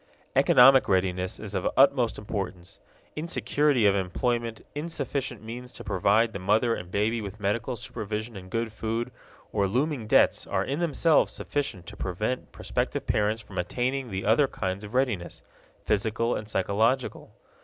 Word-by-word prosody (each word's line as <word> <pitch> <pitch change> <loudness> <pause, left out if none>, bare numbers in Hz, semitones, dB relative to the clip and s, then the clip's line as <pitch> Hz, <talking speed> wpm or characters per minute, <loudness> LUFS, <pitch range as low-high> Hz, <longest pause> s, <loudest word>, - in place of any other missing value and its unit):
Economic 130 -2 +7
readiness 95 -1 0
is 105 -2 -7
of 95 -2 0
utmost 130 -3 +4
importance. 95 -4 -5 0.4
Insecurity 150 -5 +1
of 100 - +6
employment, 115 +5 -1
insufficient 140 -6 -3
means 125 +3 -7
to - - -9
provide 110 +5 +2
the 95 - -4
mother 110 +5 +2
and 90 -5 -6
baby 110 +4 0
with 100 0 -7
medical 105 +4 -1
supervision 110 +1 -5
and 95 -1 -9
good 115 +1 -2
food, 115 +3 -3 0.4
or 100 -2 +2
looming 130 +2 -1
debts - - +3
are - - 0
in 140 +4 -2
themselves 165 -1 +3
sufficient 130 -11 -3
to - - -9
prevent 105 +7 -3
prospective - - -2
parents 110 +1 0
from 95 - -6
attaining 125 +8 -1
the 95 -1 -4
other 115 +7 +4
kinds 95 -4 -3
of 105 +4 -8
readiness 115 -10 -1 0.4
physical 110 +3 +1
and 105 0 -5
psychological. 110 +6 0
110 Hz, 150 wpm, -27 LUFS, 100-125 Hz, 0.4 s, Economic